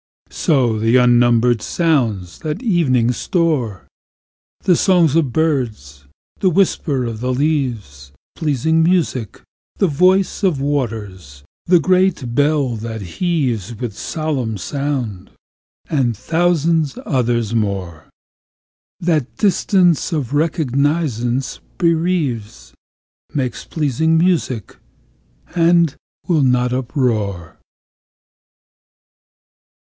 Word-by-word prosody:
So 125 - +1
the 115 +2 +2
unnumber'd 120 -1 +4
sounds 115 - -1
that 155 +9 -4
evening 135 - +2
store; 130 - -1 0.8
The 180 - +3
songs 170 -5 +3
of 155 -6 +2
birds—the 115 - -2
whisp'ring 155 -8 +1
of 115 -2 -5
the 125 +2 -1
leaves—The 135 - -1 0.5
voice 185 +7 +2
of 180 -8 +2
waters—the 110 - -2
great 185 -8 +1
bell 145 -3 +1
that 110 0 -6
heavesWith 120 - -2
solemn 130 -2 -3
sound,—and 130 - -4
thousand 165 - +1
others 120 -4 0
more, 95 -7 -3 0.9
That 160 -7 -1
distance 185 -5 +2
of 145 -5 -2
recognizance 140 -4 0 0.2
bereaves, 160 - -1 0.6
Make 130 -5 -1
pleasing 160 +1 0
music, 160 - 0 0.8
and 170 -3 +3 0.3
not 125 -7 +2
wild - - -1
uproar. 110 - -2
135 Hz, 80 wpm, -18 LUFS, 115-165 Hz, 0.9 s, unnumber'd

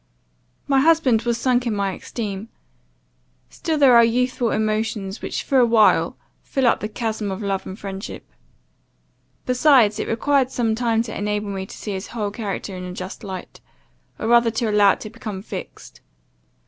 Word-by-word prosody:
My 275 -1 +3
husband 285 -6 +4
was 235 0 -1
sunk 245 0 +1
in 220 - 0
my 200 -1 -1
esteem; 210 -1 -6 1.0
still 320 -2 -2
there 270 -4 +6
are 235 - +8
youthful 245 +1 +1
emotions, 215 -2 -2
which, - - -3
for 270 - +2
a 245 - +6
while, 225 -2 +4 0.2
fill 270 -2 -1
up 235 - +3
the 210 - -4
chasm 220 -2 -3
of 190 +2 -4
love 195 -1 -2
and 190 - -7
friendship. 195 - -7 1.2
Besides, 250 -5 +4
it - - -2
required 265 +3 +1
some 230 -4 0
time 230 -1 +1
to 230 - -7
enable 210 0 -2
me 190 -1 -4
to - - -11
see 210 - -5
his 190 0 -5
whole 210 -4 -3
character 200 -3 -5
in 180 - -6
a 180 0 -6
just 185 +3 -7
light, 190 -3 -8 0.6
or 220 - -3
rather 235 0 +5
to 225 -1 -1
allow 205 -2 +5
it - - -10
to 215 - -7
become 215 -4 -7
fixed. - - -9
220 Hz, 175 wpm, -22 LUFS, 200-240 Hz, 1.2 s, are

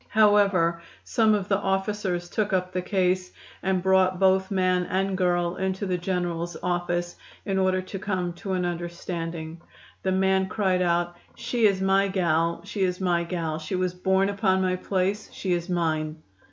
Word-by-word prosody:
However, 200 -6 +4 0.2
some 220 -3 +3
of 200 -2 -2
the 195 -1 +2
officers 195 -2 -1
took 210 +2 -1
up 185 0 0
the 180 - -1
case 185 -1 0 0.3
and 190 -2 0
brought 190 -1 +3
both 190 0 +3
man 185 -2 +1
and 195 +1 0
girl 175 -1 +1
into 190 +1 -2
the 180 -2 -1
General's 175 -2 -2
office, 175 0 -1 0.3
in 195 -1 0
order 185 0 +1
to 195 +1 -7
come 185 -3 -2
to 190 +2 -5
an 180 -1 0
understanding. 170 -1 -5 0.4
The 190 - 0
man 190 0 +2
cried 190 -3 +1
out, 175 0 0 0.2
"She 235 -1 +2
is 195 -2 0
my 195 +1 +3
gal; 170 -3 0
she 205 - -5
is 180 -1 +1
my 175 -2 +1
gal; 165 -3 -3
she 155 +4 -4
was 185 -1 0
born 190 +2 +1
upon 190 -2 +1
my 185 0 +1
place; 195 +2 -1
she 185 -2 -2
is 175 +1 -2
mine." 155 -3 0
185 Hz, 170 wpm, -26 LUFS, 175-190 Hz, 0.4 s, However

